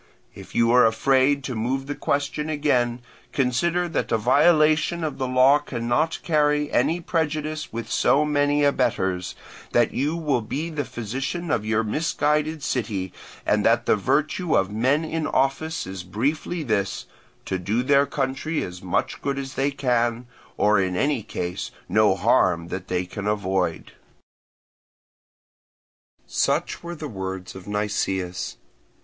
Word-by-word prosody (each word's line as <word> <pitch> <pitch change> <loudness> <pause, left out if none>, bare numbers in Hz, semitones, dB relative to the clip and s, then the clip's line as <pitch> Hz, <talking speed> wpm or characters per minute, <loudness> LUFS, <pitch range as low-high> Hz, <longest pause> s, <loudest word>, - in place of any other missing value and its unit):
If - - -12
you 115 0 +4
are 125 -1 +6
afraid 135 +5 +2
to 135 - -4
move 125 +4 -2
the 145 - -3
question 145 +2 -2
again, 125 -5 +1 0.3
consider 170 +7 +1
that 160 - -2
a 115 - +3
violation 155 +6 +3
of 155 -3 -3
the 130 - -1
law 130 +3 +5
cannot 130 +3 -1
carry 150 -2 +2
any 155 +8 +2
prejudice 155 -2 -2
with 115 +1 -5
so 150 +2 +3
many 145 0 +2
abettors, 95 -10 0 0.4
that 120 -1 +3
you 145 +5 0
will 150 -7 0
be 150 +10 -4
the 145 -3 -2
physician 130 - -4
of 105 -1 0
your 110 +1 +2
misguided 150 +4 0
city, 100 -7 -2 0.3
and - - +2
that - - +3
the - - +4
virtue 150 - 0
of 95 +1 +1
men 130 +9 +1
in 160 0 -2
office 135 +5 0
is 95 0 -6
briefly 140 - -2
this, 100 - -1 0.4
to 95 - -2
do 105 +7 0
their 140 +1 +4
country 140 +3 -2
as 90 0 -7
much 90 -2 -2
good 140 -1 -2
as 135 -1 -5
they 135 +1 +1
can, 120 -3 0 0.3
or 105 -1 +4
in 95 -1 0
any 140 +4 +1
case 90 -3 -4 0.2
no - - +3
harm 85 -2 +2
that 95 0 -5
they 90 0 -1
can 100 +3 -6
avoid." 95 -3 -1 2.3
Such - - 0
were 170 0 -6
the 155 -1 -6
words 95 -5 -6
of 95 0 -11
Nicias. 95 -3 -2
130 Hz, 145 wpm, -24 LUFS, 105-150 Hz, 2.3 s, are